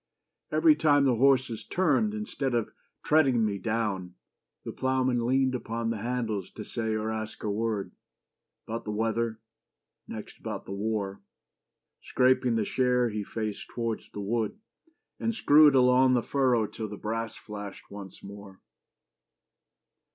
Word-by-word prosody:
Every 320 Hz, -2 st, +5 dB
time 145 Hz, -, +4 dB
the 125 Hz, -3 st, +3 dB
horses 130 Hz, -3 st, +3 dB
turned 185 Hz, +5 st, +1 dB
Instead 140 Hz, -, -2 dB
of 115 Hz, -2 st, -1 dB, 0.3 s
treading 135 Hz, -7 st, +4 dB
me 100 Hz, -2 st, -2 dB
down, 100 Hz, -4 st, -2 dB, 0.5 s
the -, -, -4 dB
ploughman 130 Hz, -2 st, 0 dB
leaned 130 Hz, 0 st, +2 dB
Upon 115 Hz, -2 st, -2 dB
the 115 Hz, -, -3 dB
handles 115 Hz, -4 st, -2 dB
to 110 Hz, -, -7 dB
say 110 Hz, 0 st, -2 dB
or 110 Hz, +1 st, -2 dB
ask 110 Hz, 0 st, -5 dB
a 105 Hz, -, -1 dB
word, 110 Hz, -1 st, -2 dB, 0.7 s
About 115 Hz, +1 st, -4 dB
the -, -, -7 dB
weather, 110 Hz, +1 st, -1 dB, 0.7 s
next -, -, -8 dB
about -, -, -5 dB
the -, -, -8 dB
war. 100 Hz, -1 st, -2 dB, 0.8 s
Scraping 125 Hz, -2 st, +2 dB
the 110 Hz, -2 st, +1 dB
share 125 Hz, 0 st, +2 dB
he 105 Hz, -1 st, -3 dB
faced 110 Hz, 0 st, -5 dB
towards 115 Hz, -2 st, -3 dB
the 105 Hz, -, -7 dB
wood, 110 Hz, -, -1 dB, 0.6 s
And 230 Hz, -1 st, -1 dB
screwed 150 Hz, -7 st, +6 dB
along 130 Hz, 0 st, +5 dB
the 120 Hz, -, +1 dB
furrow 130 Hz, -5 st, +2 dB
till 110 Hz, +1 st, -6 dB
the 105 Hz, 0 st, -8 dB
brass 115 Hz, +2 st, -3 dB
flashed 105 Hz, -2 st, -9 dB
Once 100 Hz, -2 st, -10 dB
more. 100 Hz, -1 st, -11 dB
115 Hz, 145 wpm, -28 LUFS, 105-130 Hz, 0.8 s, screwed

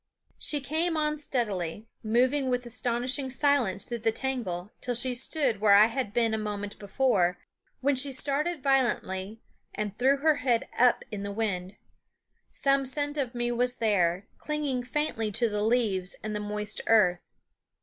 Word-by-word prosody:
She 295 Hz, -2 st, +2 dB
came 320 Hz, +4 st, 0 dB
on 300 Hz, -1 st, 0 dB
steadily, 210 Hz, -, -2 dB, 0.2 s
moving 255 Hz, +5 st, +2 dB
with 250 Hz, 0 st, -1 dB
astonishing 245 Hz, +3 st, -1 dB
silence 255 Hz, -7 st, +1 dB
through 235 Hz, -1 st, -4 dB
the 225 Hz, 0 st, +1 dB
tangle, 220 Hz, -7 st, -3 dB
till 245 Hz, -1 st, -2 dB
she 250 Hz, +2 st, +1 dB
stood 250 Hz, -3 st, -1 dB
where 205 Hz, -2 st, +6 dB
I 210 Hz, +1 st, +8 dB
had 230 Hz, -1 st, -2 dB
been 230 Hz, 0 st, +1 dB
a 220 Hz, -, 0 dB
moment 205 Hz, -1 st, -5 dB
before, 200 Hz, -4 st, +1 dB, 0.4 s
when 280 Hz, +1 st, +2 dB
she 275 Hz, +2 st, +3 dB
started 285 Hz, +4 st, -2 dB
violently 225 Hz, -6 st, 0 dB, 0.3 s
and 210 Hz, -1 st, -3 dB
threw 270 Hz, +3 st, +4 dB
her 300 Hz, +1 st, +3 dB
head 250 Hz, -5 st, +1 dB
up 250 Hz, 0 st, +4 dB
into 200 Hz, -1 st, -4 dB
the 200 Hz, -, -4 dB
wind. 195 Hz, -3 st, -2 dB, 0.7 s
Some 275 Hz, 0 st, +1 dB
scent 290 Hz, +2 st, -1 dB
of 265 Hz, -4 st, -2 dB
me 240 Hz, 0 st, -1 dB
was 245 Hz, +1 st, 0 dB
there, 190 Hz, -4 st, +1 dB
clinging 295 Hz, -4 st, -2 dB
faintly 245 Hz, -5 st, -2 dB
to 235 Hz, +3 st, +2 dB
the 210 Hz, -1 st, -2 dB
leaves 210 Hz, -5 st, +1 dB
and 215 Hz, 0 st, -3 dB
the -, -, -1 dB
moist 210 Hz, 0 st, -4 dB
earth. 185 Hz, -6 st, +3 dB
240 Hz, 160 wpm, -28 LUFS, 210-270 Hz, 0.7 s, I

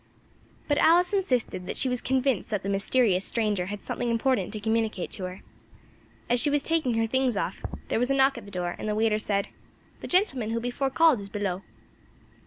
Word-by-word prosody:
But 290 Hz, -, +2 dB
Alice 355 Hz, +4 st, +4 dB
insisted 250 Hz, -, 0 dB
that -, -, -4 dB
she -, -, +2 dB
was 250 Hz, -1 st, -1 dB
convinced 260 Hz, -3 st, 0 dB
that 210 Hz, -3 st, -2 dB
the 195 Hz, -, -3 dB
mysterious 200 Hz, -1 st, +2 dB
stranger 210 Hz, -6 st, 0 dB
had 205 Hz, 0 st, -6 dB
something 240 Hz, -, -3 dB
important 230 Hz, -3 st, +1 dB
to 215 Hz, -, -5 dB
communicate 220 Hz, -3 st, -1 dB
to 190 Hz, -, -3 dB
her. 185 Hz, +1 st, -7 dB, 0.9 s
As 245 Hz, 0 st, +2 dB
she 295 Hz, -, +3 dB
was 290 Hz, 0 st, +1 dB
taking 310 Hz, -8 st, +1 dB
her 225 Hz, 0 st, +2 dB
things 255 Hz, -1 st, +1 dB
off 195 Hz, -, -3 dB, 0.3 s
there -, -, +1 dB
was 250 Hz, +2 st, +1 dB
a 275 Hz, -, +2 dB
knock 270 Hz, 0 st, +4 dB
at 235 Hz, -, -9 dB
the -, -, -10 dB
door, 180 Hz, -3 st, -3 dB
and 215 Hz, -, -3 dB
the 210 Hz, -, 0 dB
waiter 215 Hz, 0 st, +2 dB
said 200 Hz, -2 st, -1 dB, 0.5 s
"The -, -, -7 dB
gentleman 270 Hz, -, +1 dB
who 230 Hz, +1 st, -1 dB
before 245 Hz, +3 st, -1 dB
called 305 Hz, -4 st, +4 dB
is 200 Hz, -, -9 dB
below." 195 Hz, -3 st, -2 dB
230 Hz, 205 wpm, -27 LUFS, 200-265 Hz, 0.9 s, Alice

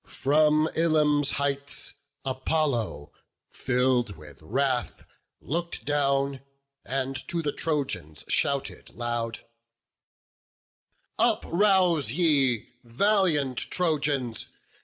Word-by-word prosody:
From 150 Hz, +2 st, +3 dB
Ilium's 150 Hz, -3 st, +2 dB
heights 140 Hz, 0 st, -1 dB, 0.3 s
Apollo, 130 Hz, -, -1 dB, 0.4 s
filled 125 Hz, -3 st, +1 dB
with 75 Hz, -3 st, -14 dB
wrath, 130 Hz, -, -1 dB, 0.3 s
Look'd 170 Hz, +3 st, -3 dB
down, 140 Hz, -1 st, +1 dB, 0.4 s
and 135 Hz, 0 st, -2 dB
to 170 Hz, -1 st, -1 dB
the 145 Hz, -, 0 dB
Trojans 135 Hz, -, -2 dB
shouted 140 Hz, -1 st, -1 dB
loud: 120 Hz, -1 st, -3 dB, 1.8 s
"Uprouse 180 Hz, -4 st, +3 dB
ye, 140 Hz, -8 st, +2 dB
valiant 150 Hz, -, +1 dB
Trojans! 145 Hz, -8 st, -1 dB
140 Hz, 75 wpm, -27 LUFS, 125-155 Hz, 1.8 s, From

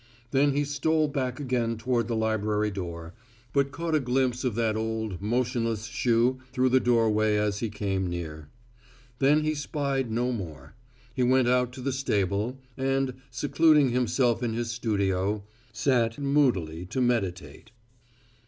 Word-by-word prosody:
Then 140 Hz, +1 st, +3 dB
he 145 Hz, +1 st, +1 dB
stole 155 Hz, +2 st, +1 dB
back 130 Hz, -3 st, -2 dB
again 120 Hz, -4 st, -1 dB
toward 120 Hz, 0 st, 0 dB
the 120 Hz, -, -1 dB
library 105 Hz, -1 st, 0 dB
door, 85 Hz, -3 st, -6 dB, 0.4 s
but 140 Hz, -1 st, +2 dB
caught 165 Hz, +1 st, -3 dB
a 155 Hz, -, +4 dB
glimpse 125 Hz, -1 st, 0 dB
of 125 Hz, -5 st, -1 dB
that 115 Hz, -2 st, +1 dB
old, 110 Hz, -4 st, -3 dB
motionless 115 Hz, 0 st, -1 dB
shoe 120 Hz, +2 st, +1 dB
through 130 Hz, 0 st, +2 dB
the 130 Hz, +1 st, +4 dB
doorway 110 Hz, -3 st, +2 dB
as 105 Hz, -1 st, 0 dB
he 115 Hz, -, -2 dB
came 95 Hz, -2 st, -2 dB
near. 80 Hz, -4 st, -6 dB, 0.7 s
Then 145 Hz, +3 st, +4 dB
he 155 Hz, 0 st, +1 dB
spied 140 Hz, -4 st, -2 dB
no 120 Hz, +3 st, 0 dB
more. 80 Hz, -, -7 dB, 0.4 s
He 130 Hz, -, -2 dB
went 125 Hz, 0 st, +4 dB
out 125 Hz, 0 st, +2 dB
to 130 Hz, -, -8 dB
the 135 Hz, +1 st, -1 dB
stable, 105 Hz, -2 st, -1 dB, 0.2 s
and, 135 Hz, 0 st, 0 dB, 0.2 s
secluding 145 Hz, +3 st, +3 dB
himself 120 Hz, -1 st, +1 dB
in 120 Hz, -2 st, -1 dB
his 115 Hz, 0 st, -2 dB
studio, 100 Hz, -3 st, 0 dB, 0.3 s
sat 115 Hz, -1 st, +1 dB
moodily 120 Hz, -, +1 dB
to 115 Hz, +7 st, -3 dB
meditate. 115 Hz, -8 st, -1 dB
120 Hz, 150 wpm, -27 LUFS, 105-130 Hz, 0.7 s, a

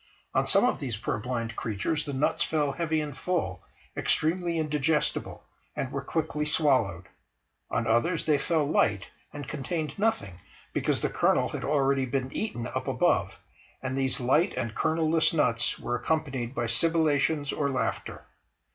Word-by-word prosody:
On -, -, +2 dB
some -, -, +5 dB
of -, -, +1 dB
these 125 Hz, -6 st, -3 dB
purblind 115 Hz, +1 st, -3 dB
creatures 135 Hz, +9 st, -2 dB
the 145 Hz, -, -4 dB
nuts 135 Hz, +3 st, +1 dB
fell 150 Hz, -3 st, +1 dB
heavy 160 Hz, +1 st, 0 dB
and 145 Hz, -3 st, -5 dB
full, 130 Hz, -, -2 dB, 0.3 s
extremely 170 Hz, +1 st, +1 dB
indigestible, 150 Hz, 0 st, 0 dB, 0.3 s
and 130 Hz, -, -3 dB
were 140 Hz, -, -3 dB
quickly 150 Hz, +1 st, -2 dB
swallowed; 130 Hz, -, +2 dB, 0.6 s
on 115 Hz, -, 0 dB
others 120 Hz, +9 st, +1 dB
they 150 Hz, -2 st, +3 dB
fell 155 Hz, 0 st, +1 dB
light, 105 Hz, -9 st, +1 dB, 0.2 s
and 145 Hz, -2 st, -7 dB
contained 155 Hz, +3 st, -3 dB
nothing, 100 Hz, -, 0 dB, 0.3 s
because -, -, 0 dB
the -, -, 0 dB
kernel -, -, +2 dB
had -, -, -5 dB
already 135 Hz, -2 st, +2 dB
been 130 Hz, +1 st, -2 dB
eaten 160 Hz, -, -3 dB
up -, -, -4 dB
above, -, -, +1 dB, 0.4 s
and 130 Hz, 0 st, -2 dB
these 135 Hz, -1 st, 0 dB
light 150 Hz, +9 st, +2 dB
and 120 Hz, -3 st, -2 dB
kernel 160 Hz, +5 st, +1 dB
less 160 Hz, +1 st, +3 dB
nuts 120 Hz, -6 st, +2 dB
were 120 Hz, 0 st, -2 dB
accompanied 135 Hz, -2 st, -2 dB
by 120 Hz, -, 0 dB
sibilations 150 Hz, +2 st, +2 dB
or 140 Hz, -1 st, 0 dB
laughter. 125 Hz, -4 st, -3 dB
140 Hz, 155 wpm, -28 LUFS, 120-160 Hz, 0.6 s, some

